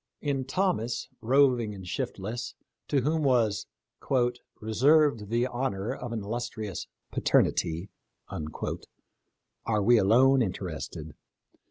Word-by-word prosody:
In 140 Hz, -3 st, -1 dB
Thomas, 130 Hz, -, -1 dB
roving 125 Hz, -3 st, +3 dB
and 95 Hz, -2 st, -9 dB
shiftless, 115 Hz, +7 st, -4 dB, 0.3 s
to 140 Hz, -3 st, +2 dB
whom 155 Hz, +5 st, +1 dB
was 120 Hz, -8 st, +2 dB, 0.5 s
" 125 Hz, -1 st, -1 dB
reserved 125 Hz, +1 st, +3 dB
the 120 Hz, +2 st, +2 dB
honor 120 Hz, -5 st, -2 dB
of 125 Hz, -2 st, -6 dB
an 110 Hz, -3 st, -3 dB
illustrious 110 Hz, -2 st, -4 dB, 0.2 s
paternity," 85 Hz, +4 st, +1 dB, 0.4 s
are 100 Hz, +6 st, -6 dB
we 120 Hz, +2 st, +6 dB
alone 130 Hz, +7 st, +5 dB
interested. 80 Hz, -, -4 dB
115 Hz, 105 wpm, -28 LUFS, 100-130 Hz, 0.5 s, we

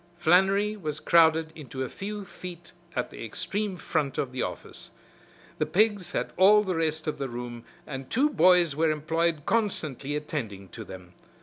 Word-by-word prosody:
Flannery 195 Hz, +5 st, +3 dB
was 155 Hz, -7 st, -4 dB
crowded 160 Hz, -1 st, +4 dB
into 130 Hz, -4 st, -6 dB
a -, -, -3 dB
few 205 Hz, +7 st, -6 dB
feet 175 Hz, -2 st, -9 dB, 0.2 s
at 125 Hz, -, -2 dB
the -, -, -8 dB
extreme 185 Hz, -, -3 dB
front 150 Hz, -6 st, -1 dB
of 130 Hz, -, -1 dB
the 130 Hz, -1 st, -3 dB
office. -, -, -6 dB, 0.7 s
The -, -, +1 dB
pigs 205 Hz, -3 st, +2 dB
had -, -, -2 dB
all 210 Hz, +3 st, +7 dB
the 190 Hz, -3 st, -1 dB
rest 160 Hz, -1 st, -1 dB
of 155 Hz, -2 st, -3 dB
the 135 Hz, -1 st, -2 dB
room 120 Hz, -1 st, -7 dB, 0.2 s
and 135 Hz, -2 st, -7 dB
two 285 Hz, +5 st, +2 dB
boys 180 Hz, -, +5 dB
were 160 Hz, +1 st, +2 dB
employed 155 Hz, 0 st, 0 dB
constantly 155 Hz, -, -1 dB
attending 115 Hz, -, -5 dB
to 115 Hz, -, -8 dB
them. 90 Hz, -3 st, -11 dB
160 Hz, 170 wpm, -27 LUFS, 135-185 Hz, 0.7 s, all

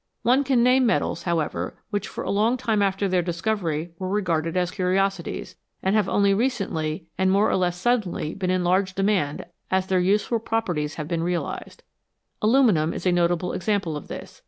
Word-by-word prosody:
One 255 Hz, +4 st, +4 dB
can 260 Hz, -3 st, +2 dB
name 255 Hz, 0 st, +4 dB
metals, 175 Hz, -6 st, 0 dB
however, 170 Hz, -3 st, -2 dB
which 205 Hz, -2 st, -2 dB
for -, -, -6 dB
a -, -, -2 dB
long 220 Hz, +5 st, +2 dB
time 220 Hz, -3 st, 0 dB
after 195 Hz, 0 st, +1 dB
their 185 Hz, -1 st, +2 dB
discovery 170 Hz, -2 st, -2 dB
were 185 Hz, -1 st, -3 dB
regarded 170 Hz, -4 st, 0 dB
as 180 Hz, 0 st, +1 dB
curiosities, 190 Hz, +2 st, -1 dB, 0.3 s
and 190 Hz, +2 st, +2 dB
have 210 Hz, -3 st, +2 dB
only 200 Hz, -1 st, +3 dB
recently 195 Hz, -9 st, -1 dB
and 190 Hz, 0 st, +3 dB
more 200 Hz, +2 st, +3 dB
or -, -, +2 dB
less 180 Hz, -1 st, 0 dB
suddenly 185 Hz, -7 st, 0 dB
been 185 Hz, -2 st, -3 dB
in 185 Hz, -1 st, +1 dB
large 185 Hz, +1 st, +1 dB
demand 195 Hz, -7 st, 0 dB, 0.2 s
as 190 Hz, 0 st, +1 dB
their 190 Hz, -1 st, +1 dB
useful 205 Hz, +5 st, +1 dB
properties 175 Hz, -10 st, -2 dB
have 155 Hz, -2 st, -5 dB
been 165 Hz, 0 st, -1 dB
realised. 175 Hz, 0 st, -4 dB, 0.6 s
Aluminium 215 Hz, -, +3 dB
is -, -, -6 dB
a 180 Hz, -, +4 dB
notable 175 Hz, 0 st, +1 dB
example 195 Hz, -5 st, -1 dB
of 150 Hz, -, -7 dB
this. -, -, -9 dB
190 Hz, 180 wpm, -24 LUFS, 175-210 Hz, 0.6 s, One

